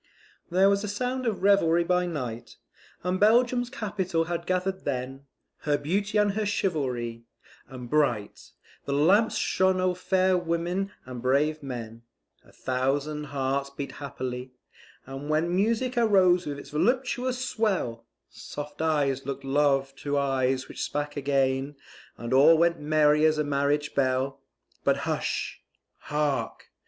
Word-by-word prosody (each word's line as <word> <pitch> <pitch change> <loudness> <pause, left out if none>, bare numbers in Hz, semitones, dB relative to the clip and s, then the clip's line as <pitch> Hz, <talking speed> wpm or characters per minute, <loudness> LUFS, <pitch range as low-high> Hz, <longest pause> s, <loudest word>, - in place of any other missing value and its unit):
[There 185 +3 +4
was 200 +1 +2
a - - -3
sound 250 +5 -2
of 210 -4 -2
revelry 175 -4 +4
by 180 +1 +1
night, 125 -8 -5 0.5
And 180 +1 -1
Belgium's 245 +3 +3
capital 195 -9 -2
had 170 +1 -4
gather'd 185 +1 -1
then 135 0 -4 0.3
Her 145 -1 +1
Beauty 195 +8 -1
and 210 -1 +3
her 215 +2 -2
chivalry, 130 - -2 0.4
and 125 -2 -9
bright 120 -7 0 0.4
The 140 - -2
lamps 190 +10 +4
shone 185 0 +2
o'er 185 0 +2
fair 185 +1 +2
women 175 +3 -2
and 125 -2 -7
brave 145 +5 +1
men; 115 -4 -7 0.4
A - - -21
thousand 140 +4 -1
hearts 140 0 -2
beat 140 0 -6
happily; 130 -2 -6 0.5
and 135 +2 -7
when 165 +3 +1
Music 230 +6 +1
arose 185 -6 +4
with 145 -1 -4
its 140 0 -11
voluptuous 250 - 0
swell, 190 - -1 0.2
Soft 145 +1 -8
eyes 140 -4 0
look'd 140 - -4
love 135 -1 +1
to 145 +1 -2
eyes 130 -2 0
which - - -8
spake 145 0 -3
again, 135 0 0 0.4
And 120 +1 -4
all 150 +5 +7
went 170 +1 +2
merry 150 0 +3
as 155 -1 +3
a 150 - +1
marriage 145 +1 0
bell; 130 0 0 0.4
But - - +3
hush! - - -2 0.4
hark! 150 -2 -2
150 Hz, 140 wpm, -27 LUFS, 135-185 Hz, 0.5 s, all